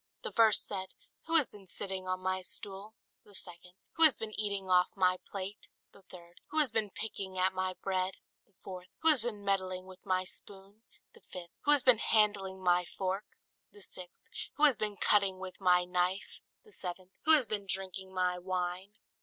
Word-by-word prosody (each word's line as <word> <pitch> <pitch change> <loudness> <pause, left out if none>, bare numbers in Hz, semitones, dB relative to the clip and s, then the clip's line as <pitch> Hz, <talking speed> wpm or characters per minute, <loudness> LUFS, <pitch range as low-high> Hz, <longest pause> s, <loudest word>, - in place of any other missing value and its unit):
The - - -3
first 225 -2 +5
said, 190 -2 -3 0.3
"Who 325 - +1
has 305 -4 +6
been 200 -2 -15
sitting 190 0 -4
on 185 0 -1
my 185 0 0
stool?" 200 +3 -4 0.3
The 205 - -13
second, 180 0 -7 0.2
"Who 330 - +4
has 310 -5 +7
been 220 -1 -5
eating 200 -3 -2
off 180 -1 +5
my 185 -1 +4
plate?" 195 +1 -6 0.2
The 200 - -18
third, 175 -2 -15
"Who 310 - -6
has 295 -6 +3
been 220 -2 0
picking 195 -2 -5
at 185 +1 +3
my 185 0 -1
bread?" 190 -1 0 0.3
the 200 - -37
fourth, 185 -1 -7 0.2
"Who 325 - +6
has 295 -6 +4
been 215 -4 -4
meddling 185 -2 0
with 185 -1 -13
my 185 -1 +1
spoon?" 195 +3 -12 0.3
The - - -18
fifth, 175 -2 -8
"Who 295 - +5
has 290 -4 +4
been 250 -4 +6
handling 200 -4 +2
my 180 0 +4
fork?" 190 +3 -3 0.5
The 205 - -16
sixth, 180 -2 -10 0.3
"Who 300 - -2
has 290 -4 +7
been 210 -2 -3
cutting 200 -2 +3
with 185 +1 -8
my 180 -1 +5
knife?" 180 +2 -1 0.2
The 430 - -19
seventh, 185 - -6
"Who 320 - +7
has 295 -5 +6
been 205 -2 -3
drinking 190 0 -4
my 180 -1 0
wine?" 185 +2 -3
190 Hz, 195 wpm, -32 LUFS, 185-210 Hz, 0.5 s, has